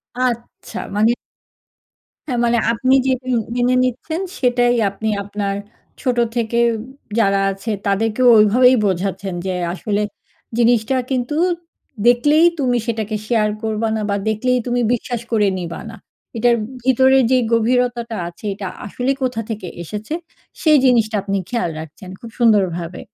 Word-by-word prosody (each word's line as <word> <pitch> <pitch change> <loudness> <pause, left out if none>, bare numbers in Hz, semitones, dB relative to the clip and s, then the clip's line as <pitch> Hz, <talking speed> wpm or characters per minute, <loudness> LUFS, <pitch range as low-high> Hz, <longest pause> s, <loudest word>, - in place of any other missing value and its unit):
আচ্ছা, 245 -2 -3 0.2
মানে। 220 +3 +4 1.2
হ্যাঁ, 245 -2 0
মানে 235 0 +2
আপনি 255 +3 +1
যে 265 - +3 0.2
উম 250 -2 +2 0.2
মেনে 245 +1 +2
নিচ্ছেন 315 +8 -2 0.2
সেটাই 245 -1 +3
আপনি 215 +3 -4
আপনার 200 0 -3 0.5
ছোট 250 -2 0 0.2
থেকে 235 0 -1 0.2
উব 220 - -5 0.4
যারা 195 -2 +3
আছে 195 +4 -5 0.2
তাদেরকেও 225 +5 +2
ওইভাবেই 250 +5 +5
বোঝাচ্ছেন 190 0 -2
যে, 185 - -1 0.2
‘’আসলে 205 +2 -2 0.6
জিনিসটা 240 +1 +3 0.2
কিন্তু 255 +3 -1 0.7
দেখলেই 290 +7 +5
তুমি 250 -3 +2
সেটাকে 220 -2 -2
শেয়ার 215 -3 +2
করবা 220 0 -1
না 220 - -2
বা 200 - +1
দেখলেই 250 +4 +1
তুমি 245 0 +1
বিশ্বাস 240 0 -3
করে 210 -3 +3
নিবা 170 -2 -5
না।‘’ 225 - -9 0.4
এটার 240 +1 +4 0.3
ভিতরের 265 +1 +4
যেই 255 -1 +4
গভীরতাটা 235 0 +1
আছে 175 +5 -11
এটা 195 -1 -6 0.2
আসলে 250 +6 -1
কোথা 245 -3 -1
থেকে 210 -4 -5 0.2
এসেছে, 210 - -6 0.5
সেই 310 -3 +5
জিনিসটা 230 -3 +3
আপনি 200 0 -1
খেয়াল 235 -8 -1
রাখছেন 160 +4 -10
খুব 230 - -9
সুন্দরভাবে। 185 -7 +2
230 Hz, 140 wpm, -19 LUFS, 210-250 Hz, 1.2 s, ওইভাবেই